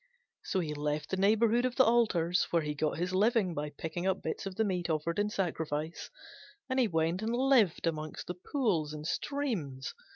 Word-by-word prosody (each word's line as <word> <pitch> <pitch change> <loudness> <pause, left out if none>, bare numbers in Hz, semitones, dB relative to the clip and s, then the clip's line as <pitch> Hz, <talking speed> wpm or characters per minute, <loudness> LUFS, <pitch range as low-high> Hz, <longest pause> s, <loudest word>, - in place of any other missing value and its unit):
So 190 - 0
he 155 -3 -3
left 150 0 -2
the - - +2
neighbourhood 220 +4 +3
of 255 -1 0
the 260 - +6
altars, 200 -8 +2
where 170 -2 +2
he 150 0 -2
got 150 +1 -1
his 180 +2 -2
living 205 -1 +3
by 150 -1 -3
picking 160 +5 -4
up 190 - 0
bits - - -3
of 190 - -6
the 220 - +2
meat 180 -4 -1
offered 165 +3 -1
in 205 0 +1
sacrifice, 160 -5 -3 0.6
and 260 -5 +1
went 165 +3 +1
and 225 +2 -1
lived 250 -10 +3
among 155 -2 -2
the 180 - -4
pools 180 - -1
and 150 0 -7
streams. 180 - -2
180 Hz, 190 wpm, -31 LUFS, 155-220 Hz, 0.6 s, the